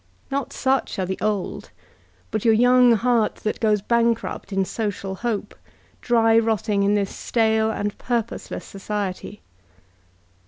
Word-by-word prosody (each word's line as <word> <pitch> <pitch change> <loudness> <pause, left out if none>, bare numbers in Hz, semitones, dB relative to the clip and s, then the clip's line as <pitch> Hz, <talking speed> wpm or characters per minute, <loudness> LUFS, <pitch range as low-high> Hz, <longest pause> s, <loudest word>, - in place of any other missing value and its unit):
Not 280 0 -2
such 265 -1 0
are 190 - -1
the 190 +1 -4
old, 210 -3 -2 0.6
but 215 - -2
your 225 -1 +5
young 245 +1 +5
heart 230 0 +2
that 215 - -1
goes 210 -3 +2
bankrupt 235 -1 0
in 195 -1 +1
social 200 -2 -3
hope, 210 0 -3 0.5
dry 225 -1 +4
rotting 220 -2 0
in 200 +1 +3
this 200 -2 -1
stale 220 -1 +1
and 205 -1 -2
purposeless 235 -2 -3
society. 200 0 -5
220 Hz, 130 wpm, -23 LUFS, 205-235 Hz, 0.6 s, your